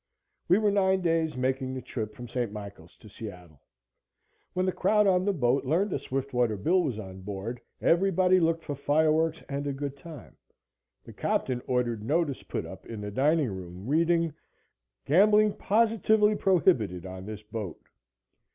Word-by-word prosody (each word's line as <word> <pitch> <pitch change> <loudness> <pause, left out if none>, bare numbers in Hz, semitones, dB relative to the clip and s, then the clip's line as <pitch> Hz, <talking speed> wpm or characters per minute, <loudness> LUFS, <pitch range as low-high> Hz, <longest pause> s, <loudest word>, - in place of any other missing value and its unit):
We 180 - +5
were 210 -1 +2
nine 190 -1 +2
days 165 -4 0
making 130 0 -1
the 130 - -4
trip 110 -3 -5
from 120 - -8
St. 120 -2 -2
Michael 100 -5 -9
to 100 - -18
Seattle. 90 -8 -10 0.9
When 185 0 0
the 185 - +1
crowd 210 +4 +2
on 185 -1 +3
the 205 - +3
boat 135 -6 +1
learned 175 +9 +1
that - - -1
Swiftwater 125 -5 -1
Bill 175 - +2
was 135 -10 -2
on 95 -3 -8
board, 105 +5 -5 0.2
everybody 185 +1 +3
looked 165 -1 +1
for 145 - -4
fireworks 155 +3 +1
and 140 +1 -3
a 140 - -1
good 140 0 -4
time. 150 -2 -12 0.7
The - - -12
captain 125 -2 -1
ordered 120 -3 0
notice 150 +2 0
put - - -4
up - - -11
in 115 -2 -7
the 105 0 -5
dining 145 +2 +2
room, 90 0 -8
reading: 165 +3 +2 0.7
"Gambling 210 +6 +5
positively 220 -1 +3
prohibited 155 - +2
on 95 +1 -8
this 105 0 -7
boat." 105 -4 -6
140 Hz, 160 wpm, -28 LUFS, 110-180 Hz, 0.9 s, We